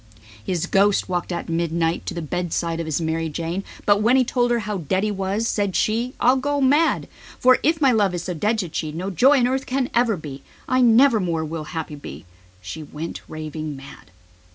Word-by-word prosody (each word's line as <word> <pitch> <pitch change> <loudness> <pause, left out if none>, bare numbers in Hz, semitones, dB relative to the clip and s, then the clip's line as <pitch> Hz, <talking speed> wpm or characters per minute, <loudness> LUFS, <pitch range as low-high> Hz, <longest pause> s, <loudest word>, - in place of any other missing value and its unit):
His 170 +7 -1
ghost 200 +1 +2
walked 180 0 -2
at 175 - -4
midnight 165 0 -1
to - - -3
the 170 - -4
bedside 170 0 -2
of 165 - -3
his 155 -1 -1
Mar 160 0 -1
i 165 - -2
Jane 165 +5 -3 0.2
He 220 +6 +4
told 245 0 0
her 240 - +2
how 210 -2 -3
dead 185 +5 -1
he 215 - 0
was; 200 +3 -1
said 200 -4 -1
she: 235 +4 0
"I'll 255 +2 +4
go 285 +2 -1
mad." 290 +5 +3 0.6
"Since 315 +1 +2
my 270 -3 +5
love 205 -5 +2
he - - -2
is 175 - -4
so 180 - -3
dead," 210 +7 0
said 180 -6 -4
she, 155 0 -3
"All 190 +2 -3
joy 265 - +5
on 245 - +3
earth 265 +1 -2
has 255 -1 0
fled 240 +1 +3
for 220 -4 0
me." 140 -4 -8 0.3
"I 255 0 +2
never 240 0 +5
more 165 -4 -1
will 155 0 -5
happy 160 -1 -5
be.", 145 - -8
and 80 - -14 0.4
she 155 - -6
went 155 +2 -7
raving 155 -1 -6
mad. 135 -7 -13
185 Hz, 220 wpm, -22 LUFS, 160-235 Hz, 0.6 s, my